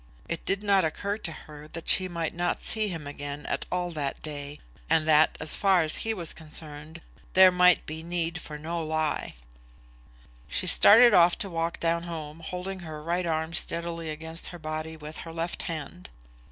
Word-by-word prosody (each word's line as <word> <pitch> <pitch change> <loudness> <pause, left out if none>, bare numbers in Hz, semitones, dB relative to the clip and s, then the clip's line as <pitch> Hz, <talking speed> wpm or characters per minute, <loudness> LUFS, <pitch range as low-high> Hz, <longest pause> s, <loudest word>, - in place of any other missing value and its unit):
It 170 - -4
did 195 +1 0
not 200 -2 +4
occur 200 +6 -2
to 165 - -4
her 150 -1 -11
that 165 - -7
she 185 - +6
might 170 -3 -3
not 175 +1 -2
see 220 -1 0
him 165 -6 -5
again 145 0 -6
at - - -3
all 180 -1 -1
that 145 -4 -3
day; 145 -1 -6 0.3
and 160 -1 +3
that, 155 0 +4
as 155 - +1
far 190 -4 +3
as 155 - 0
he 225 - -1
was 175 -7 -1
concerned, 155 0 -6 0.3
there 185 0 +8
might 180 -1 +4
be 155 +1 -6
need 170 0 -3
for 150 - -8
no 165 +2 -4
lie. 155 - -2 1.1
She - - -1
started 235 +2 +8
off 175 -1 +6
to 195 - -5
walk 165 0 -2
down 170 0 +1
home, 155 -1 -7
holding 180 +3 -5
her 160 -3 -7
right 175 +2 -1
arm 160 0 -1
steadily 170 -1 -1
against 160 +2 -3
her 175 - -8
body 155 0 -5
with 155 0 -9
her 165 - -8
left 165 +1 -4
hand. 145 - -6
165 Hz, 185 wpm, -27 LUFS, 155-175 Hz, 1.1 s, there